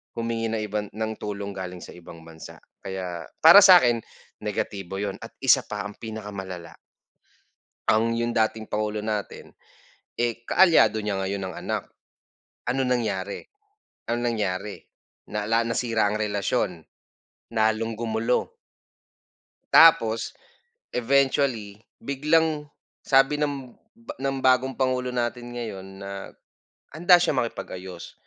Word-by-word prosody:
humingi 115 -1 -2
ng 110 -1 -2
iban 105 0 -3
ng 110 0 -2
tulong 100 -1 -5
galing 90 -2 -7
sa - - -10
ibang 85 -1 -13
bansa 80 0 -11 0.2
kaya 90 -4 -6 0.2
para 165 +5 +11
sakin 175 - +7 0.4
negatibo 95 -2 -4
yun 100 0 -3
at - - -11
isa - - +6
pa - - -4
ang 105 - -6
pinakamalala. 100 -6 -7 1.1
Ang 115 +1 +2
yung 120 0 -1
dating 110 0 0
pangulo 105 0 -3
natin, 105 -2 -4 0.6
eh, 120 -1 -1
kaalyado 165 -2 +4
niya 105 -2 -2
ngayon 95 0 -3
ang 95 - -6
anak, - - -3 0.8
anong 130 +1 0
nangyari? 100 -4 -3 0.7
Anong 120 +1 -1
nangyari 100 -1 -3 0.5
nala 110 +2 0
nasira 115 -2 0
ang 105 - -2
relasyon, 100 -4 -1 0.7
lalong 110 0 +1
gumulo. 115 - -1 1.2
Tapos 115 -9 +6 0.6
eventually 125 -4 +1 0.2
biglang 150 +2 +1 0.4
sabi 135 +2 +4
ng 140 -4 -3 0.2
ba 235 - -9
ng 135 0 -1
bagong 130 +1 +3
pangulo 130 -1 0
natin 120 0 -3
ngayon 100 -5 -6
na 100 0 -7 0.6
handa 175 +4 +6
siyang 155 -7 +1
makipag-ayos 95 -6 -7
110 Hz, 115 wpm, -25 LUFS, 100-125 Hz, 1.2 s, para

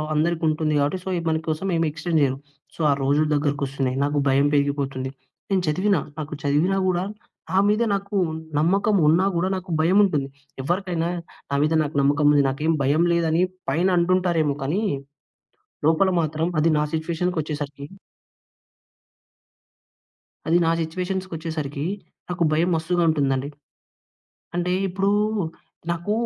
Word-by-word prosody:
అందరికీ 165 +2 0
ఉంటుంది 155 0 0
గాబట్టి 145 +6 0
సో, - - -3 0.2
మనకోసం 160 +2 -2
ఏమి 165 0 +1
ఎక్స్‌టెండ్ 160 +1 -1
చేయరు. 135 -2 +1 0.4
సో, - - -21
ఆ - - +5
రోజులు 145 +3 +2
దగ్గరకి 145 -1 0
వస్తున్నాయి. 135 -1 -2
నాకు 145 +1 0
భయం 135 +1 +4
పెరిగిపోతుంది. 140 -2 0 0.4
నేను 190 -1 +3
చదివినా, 185 +4 +2 0.2
నాకు 150 0 -5
చదివినా 150 +7 +2
కూడా 180 0 0 0.5
నా 185 - +1
మీద 210 +3 +2
నాకు 200 +1 -3 0.4
నమ్మకం 195 +7 +2
ఉన్నా 170 +5 +4
కూడా 175 +2 +1
నాకు 185 0 -7
భయం 175 +5 +3
ఉంటుంది. 150 -8 +1 0.4
ఎవరికైనా 175 +2 -1 0.4
నా - - +1
మీద 155 +2 +2
నాకు 150 0 -5
నమ్మకం 145 +2 +2
ఉంది, 145 -1 +5
నాకేం 150 +5 0
భయం 145 +5 +3
లేదని 165 0 +2 0.3
పైన 165 +7 +2
అంటుంటారేమో 170 -4 +2
కానీ, 160 +10 0 1.1
లోపల 165 +4 +4
మాత్రం 160 +1 -1
అది 165 +2 +3
నా - - +2
సిట్యుయేషన్‌కొచ్చేసరికి 155 -4 -3 2.6
అది 165 +2 +3
నా 165 - +3
సిట్యుయేషన్స్‌కొచ్చేసరికి 165 -4 -4 0.4
నాకు 175 -1 -1
భయం 165 +3 +2
మస్తుగా 170 +2 0
ఉంటుందండి. 140 -3 0 1.1
అంటే, 175 +1 0 0.2
ఇప్పుడు 195 +2 0 0.8
నాకు 170 +4 -2
160 Hz, 130 wpm, -23 LUFS, 145-180 Hz, 2.6 s, ఆ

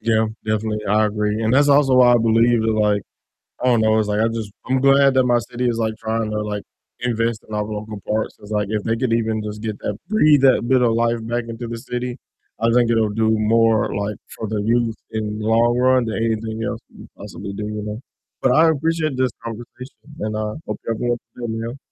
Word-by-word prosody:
Yeah, 110 0 +2 0.2
definitely, 110 0 -2
I 105 +2 +3
agree, 105 +1 -1
and 110 - +1
that's 145 +2 +4
also 140 -2 +5
why 125 -1 +6
I 120 - +5
believe 115 +1 +3
that, 110 - +1
like, 105 -2 +1 0.6
I - - -1
don't 120 -3 +4
know, 110 0 +3
it's, 110 -1 +1
like, 105 +1 0
I 115 - +3
just 115 -3 -4 0.2
I'm 130 0 +2
glad 135 0 +5
that 130 - +5
my 120 -1 +3
city 120 +3 -3
is, 115 -1 -1
like, 110 -1 0
tryna, 110 0 -2
to 105 0 -2
like, 105 -1 -4 0.4
invest 115 -2 -1
in - - -8
our 105 - 0
local 105 0 -6
parks, 110 0 -1
it's, 105 +1 -13
like, 105 -1 0
if 105 -1 -2
they 115 0 0
could 120 0 -1
even 110 -1 0
just 105 0 -6
get 110 -2 -4
that 105 - -4
breathe 155 -10 +4
that 130 -3 +4
bit 130 -1 +3
of 115 -2 +3
life 115 +1 +1
back 120 0 -2
into 115 +1 -6
the 115 - -5
city, 125 +2 -4 0.4
I 115 +1 +2
think 120 -1 +3
it'll 115 -2 +2
do 110 +1 +1
more, 110 0 +2
like, 100 +1 -3 0.2
for 110 - -4
the 105 0 -2
youth 115 +1 +1 0.2
in 105 -1 -3
the 110 - -3
long 120 +2 +3
run 130 0 +3
than 110 - -3
anything 110 0 -2
else 100 - -3
we - - -19
could - - -23
possibly 100 - -8
do, 105 +1 -5
you 105 0 -4
know? 105 +1 -5 0.4
But 130 - +4
I 160 +4 +5
appreciate 160 -2 0
this 130 -2 +1
conversation, 120 +3 -9 0.2
and 110 0 -3
I 105 0 -2
hope - - -4
you 115 - 0
have - - -6
a - - -1
wonderful 120 0 +1 0.2
day, 120 - -3 0.2
man. 120 +3 -7
115 Hz, 240 wpm, -21 LUFS, 110-120 Hz, 0.6 s, why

